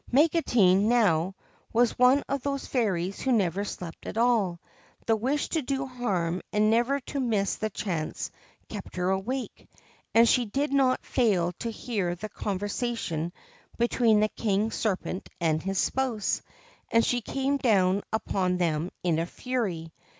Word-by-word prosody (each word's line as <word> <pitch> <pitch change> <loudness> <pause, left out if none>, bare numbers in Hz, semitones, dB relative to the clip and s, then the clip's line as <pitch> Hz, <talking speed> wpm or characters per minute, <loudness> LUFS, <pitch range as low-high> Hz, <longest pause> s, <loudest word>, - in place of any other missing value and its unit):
Magotine, 245 - +4
now, 190 -7 +3 0.4
was 240 +1 +3
one 255 +3 +5
of 280 -1 -1
those 275 0 -2
fairies 195 -7 -1
who 265 - 0
never 200 -4 +2
slept 180 -4 -7
at - - -5
all: 225 -7 +2 0.5
the 225 - +3
wish 265 +7 -1
to 320 - 0
do 270 0 -2
harm 190 -9 -1
and 215 +1 +3
never 240 +5 +2
to 280 - -5
miss 215 -6 0
the 215 - -2
chance 175 -6 -3 0.4
kept 205 -3 -8
her 180 +1 0
awake; 235 +7 -3 0.5
and 230 +1 +7
she 245 0 +3
did 280 +7 -1
not 265 -2 +2
fail 195 -9 +2
to 230 - -3
hear 205 -6 -2
the 215 +5 -7
conversation 205 -4 -2 0.5
between 235 -2 +3
the 215 - +3
King 210 0 0
Serpent 190 -4 -2
and 160 -2 +1
his 195 +2 -3
spouse; 250 -4 0 0.5
and 230 0 +4
she 245 0 +1
came 275 +4 -1
down 200 -7 +3
upon 185 -4 0
them 165 -1 0
in 170 -3 +2
a 165 - -1
fury. 185 -10 -3
215 Hz, 150 wpm, -27 LUFS, 185-245 Hz, 0.5 s, and